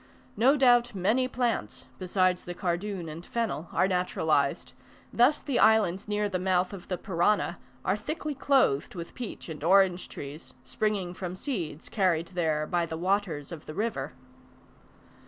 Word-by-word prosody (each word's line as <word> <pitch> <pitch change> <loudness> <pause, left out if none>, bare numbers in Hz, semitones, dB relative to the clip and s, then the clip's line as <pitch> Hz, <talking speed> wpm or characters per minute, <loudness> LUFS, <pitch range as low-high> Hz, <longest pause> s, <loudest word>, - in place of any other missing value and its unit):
No 270 +6 +4
doubt 245 -3 +4
many 220 +8 +2
plants, 245 -2 -2
besides 185 -1 +1
the 175 - -6
cardoon 180 0 -2
and 160 +2 -7
fennel, 220 -7 -3
are 185 - +2
naturalized; 160 -6 0 0.4
thus 250 +6 +4
the 275 - 0
islands 215 -4 +4
near 210 0 0
the 185 -2 -2
mouth 185 0 +1
of 190 -3 -9
the 180 - -2
Parana, 185 +2 +1 0.3
are - - +2
thickly 305 +6 -4
clothed 265 - +2
with 170 -1 -7
peach 245 -4 -7
and 155 -3 -7
orange 185 0 +4
trees, 145 +3 -8
springing 200 -5 -1
from 180 -1 -5
seeds 180 - -4
carried 175 -5 +1
there 160 -4 0
by 170 +1 0
the 160 - -5
waters 180 -5 -1
of 165 -3 -9
the 155 - -7
river. 195 -10 -2
185 Hz, 155 wpm, -28 LUFS, 170-215 Hz, 0.4 s, No